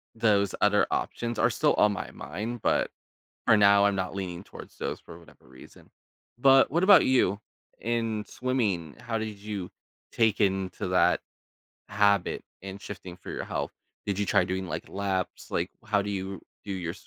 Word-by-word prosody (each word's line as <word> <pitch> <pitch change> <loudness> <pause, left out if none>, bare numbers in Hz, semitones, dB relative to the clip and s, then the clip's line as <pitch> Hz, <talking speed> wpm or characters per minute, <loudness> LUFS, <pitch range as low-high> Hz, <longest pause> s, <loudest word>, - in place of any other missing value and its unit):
those 105 -4 +2
other 105 0 +4
options 120 0 -2
are - - +4
still - - +2
on 105 - +4
my 95 - -5
mind, 115 +6 -6
but - - +2 0.6
for 110 - +6
now, 100 -1 +6
I'm 100 -1 +1
not 95 0 -2
leaning 95 -2 -5
towards - - -12
those - - -3
for 85 - -12
whatever 85 -6 -19
reason. 65 0 -16 0.5
But 135 +1 +6
what 170 +5 +1
about 200 0 +7
you? 105 -6 +2 0.4
In 115 -2 -1
swimming, 105 - -1
how 120 -1 -3
did 110 -2 -5
you 100 -3 -5 0.4
take 110 -2 +2
into 95 -2 0
that - - +3 0.7
habit 100 -2 +2 0.2
and 95 +1 -8
shifting 95 -3 -8
for - - -9
your - - -4
health? - - -3 0.3
Did 100 -1 -2
you 105 - +1
try 95 - +3
doing, 95 +1 -3
like, - - -5
laps? 95 -2 -3
Like, - - -1
how 105 -1 +2
do 100 - -4
you 95 -1 -4 0.2
do 100 - -3
your 85 -3 -3
100 Hz, 170 wpm, -28 LUFS, 95-110 Hz, 0.7 s, about